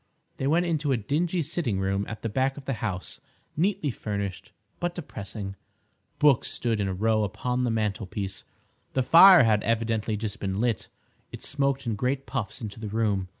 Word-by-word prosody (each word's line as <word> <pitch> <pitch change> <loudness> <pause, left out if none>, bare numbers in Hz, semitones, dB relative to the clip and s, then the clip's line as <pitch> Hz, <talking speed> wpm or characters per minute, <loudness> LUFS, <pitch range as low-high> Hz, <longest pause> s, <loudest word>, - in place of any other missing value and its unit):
They 135 - -1
went 170 +4 +3
into 155 -4 0
a 130 - +3
dingy 160 - 0
sitting 140 - -1
room 95 +1 0
at 115 - -7
the - - 0
back 130 +5 0
of 140 - -9
the 135 - -1
house, 95 -5 -3 0.3
neatly 180 -3 +1
furnished 100 -4 -4 0.3
but 175 0 -2
depressing. 100 - -6 0.6
Books 145 -4 +4
stood 115 -3 -1
in 100 - 0
a 95 - -1
row 110 +2 +2
upon 125 +5 -1
the - - +1
mantelpiece. 105 -3 -2 0.5
The 130 - +2
fire 175 +4 +9
had 110 -2 +3
evidently 115 -1 0
just 105 -1 -4
been 95 0 -2
lit. 115 -3 0 0.4
It - - -9
smoked 140 -1 0
in 115 - 0
great 130 +5 -1
puffs 110 +2 -4
into 110 -1 -6
the 110 - -5
room. 105 -3 0
115 Hz, 180 wpm, -27 LUFS, 105-140 Hz, 0.6 s, fire